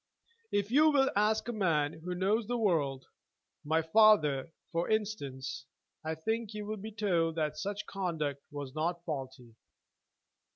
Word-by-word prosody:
If 205 +1 0
you 305 +4 +6
will 275 -3 +3
ask 215 +2 +2
any 235 -3 -4
man 155 -5 +1
who 180 0 -3
knows 200 +4 +1
the 245 - 0
world, 150 - +1 0.6
my 160 +2 +1
father, 160 -7 +4 0.2
for 170 0 -1
instance, 145 -11 -2 0.4
I 160 0 -2
think 220 +6 -2
you 210 -1 -4
will 215 +1 -4
be 215 +2 -7
told 175 -6 +1
that 155 -2 -1
such 200 +6 -4
conduct 160 -8 -2
was 145 -3 -6
not 170 +3 -2
faulty. 130 -6 -6
175 Hz, 150 wpm, -32 LUFS, 150-215 Hz, 0.6 s, you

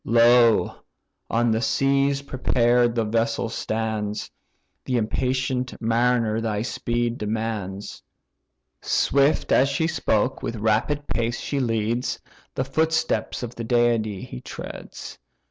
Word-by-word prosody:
"Lo! 115 0 +4 0.5
on 115 0 +2
the 110 +1 +1
seas, 135 +4 +1
prepared 120 -3 +2
the 115 -2 +1
vessel 115 +1 0
stands, 110 -2 -3 0.5
The 125 - -1
impatient 125 +2 -1
mariner 115 -1 +1
thy 110 -2 -1
speed 120 0 -2
demands." 105 -2 -4 0.8
Swift 140 +2 +2
as 135 +2 +4
she 150 +4 0
spoke, 130 -6 0
with 115 - -3
rapid 110 +7 0
pace 120 -2 -1
she 140 - -2
leads; 115 0 -1 0.4
The 130 - -1
footsteps 160 0 0
of 120 -1 -5
the 115 - -6
deity 115 -4 +1
he 60 - -8
treads. - - -9
120 Hz, 115 wpm, -24 LUFS, 110-130 Hz, 0.8 s, Lo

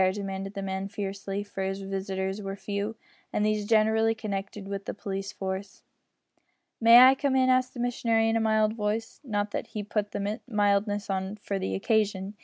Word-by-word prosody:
demanded 195 0 -5
the 195 - -3
man, 190 0 -3
fiercely, 195 0 -4
for 200 -1 -6
his 195 +1 -2
visitors 195 0 -3
were 195 -1 -4
few, 200 +2 -3 0.4
and 210 - +1
these 215 -1 0
generally 220 0 +3
connected 200 -2 -5
with 200 0 -5
the - - -4
police 195 -1 -4
force. 190 +1 -5 1.0
"May 230 +1 +8
I 260 +1 +9
come 270 0 0
in?" 260 0 +4
asked 255 0 +2
the - - -7
missionary 230 -2 +1
in 225 - +2
a - - +3
mild 220 -1 +3
voice 220 +1 -3
not 205 -5 -2
that - - -3
he 210 - -5
put 210 0 -2
the 205 +2 -3
mildness 205 -2 +1
on 190 +1 -2
for 200 -1 -4
the 95 - -2
occasion. 200 - 0
205 Hz, 185 wpm, -28 LUFS, 195-220 Hz, 1.0 s, I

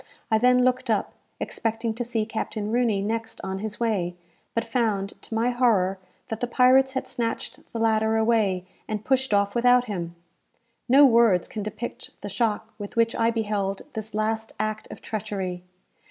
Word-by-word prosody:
I 220 - +4
then 250 +1 +5
looked 255 0 +1
up, 215 -2 0 0.3
expecting 225 0 -2
to 240 +2 -3
see 230 -2 -1
Captain 215 -1 -3
Rooney 230 -5 +2
next 225 +2 -3
on 190 0 -3
his 215 +1 -5
way; 195 -7 0 0.4
but 230 - 0
found, 220 -4 0
to 225 - -6
my 235 +2 +2
horror, 205 -7 +2 0.3
that 225 - -3
the 245 - -1
pirates 260 +2 +4
had 260 -1 -2
snatched 235 -3 -3
the - - -4
ladder 220 -1 +2
away, 220 -5 +2 0.2
and 215 -1 -4
pushed 265 -1 +1
off 200 0 +2
without 245 +1 +4
him! 175 -6 -4 0.7
No 280 +3 +8
words 230 -8 +4
can 215 - -5
depict 215 +3 -7
the 205 - -5
shock 220 +1 -1
with 205 -1 -7
which 230 0 +2
I 230 0 +3
beheld 210 -4 -1
this 220 -2 -6
last 220 +1 -1
act 215 0 -2
of - - -10
treachery. 195 -4 -4
220 Hz, 170 wpm, -25 LUFS, 205-235 Hz, 0.7 s, No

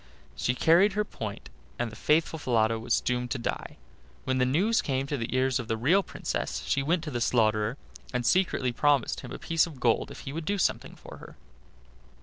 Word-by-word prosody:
She 125 - 0
carried 175 +9 +4
her 210 +1 0
point, 105 - -7 0.3
and 120 -2 -2
the - - -11
faithful 160 +1 +1
Falada 115 -4 +1
was 115 +1 0
doomed 125 0 -1
to 135 - -2
die. 120 - -4 0.5
When 130 0 0
the 125 - +3
news 195 - +2
came 135 -1 -1
to 145 - -3
the 115 -4 -4
ears 130 0 +2
of 120 - -5
the 115 - -1
real 160 - +3
Princess 60 - -4
she 135 - +1
went 165 +4 0
to 155 - -5
the 120 -2 -3
slaughterer, 110 0 +2 0.3
and 125 -1 -2
secretly 175 -8 +2
promised 140 +1 +1
him - - -9
a - - -5
piece 165 0 +1
of 150 -6 -11
gold 120 -2 +1
if - - -10
he 135 - -7
would 160 0 -5
do 205 +4 0
something 190 - -1
for - - -12
her. - - -13
130 Hz, 210 wpm, -28 LUFS, 120-160 Hz, 0.5 s, carried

